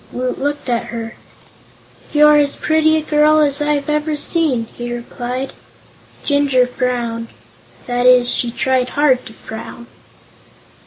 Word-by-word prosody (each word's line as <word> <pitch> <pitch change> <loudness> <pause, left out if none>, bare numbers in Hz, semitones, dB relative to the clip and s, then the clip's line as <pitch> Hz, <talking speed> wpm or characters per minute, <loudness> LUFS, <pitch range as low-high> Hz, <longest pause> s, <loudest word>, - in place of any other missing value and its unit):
Woot 250 0 -3
looked 290 +1 -3
at 240 -2 -1
her. 230 0 -6 1.0
"You're 300 0 +6
as 285 -1 +2
pretty 315 0 +2
a 310 - -2
girl 305 0 +3
as 290 -1 +2
I've 295 -1 0
ever 300 0 -1
seen," 290 -7 0
he 240 0 -6
replied. 245 +2 -5 0.7
Jinjur 285 -3 +2
frowned. 240 -2 -3 0.6
That 245 0 0
is, 250 -1 +5
she 240 - 0
tried 255 +1 0
hard 285 -3 +2
to 225 - -11
frown. 220 +2 -9
260 Hz, 130 wpm, -17 LUFS, 245-295 Hz, 1.0 s, You're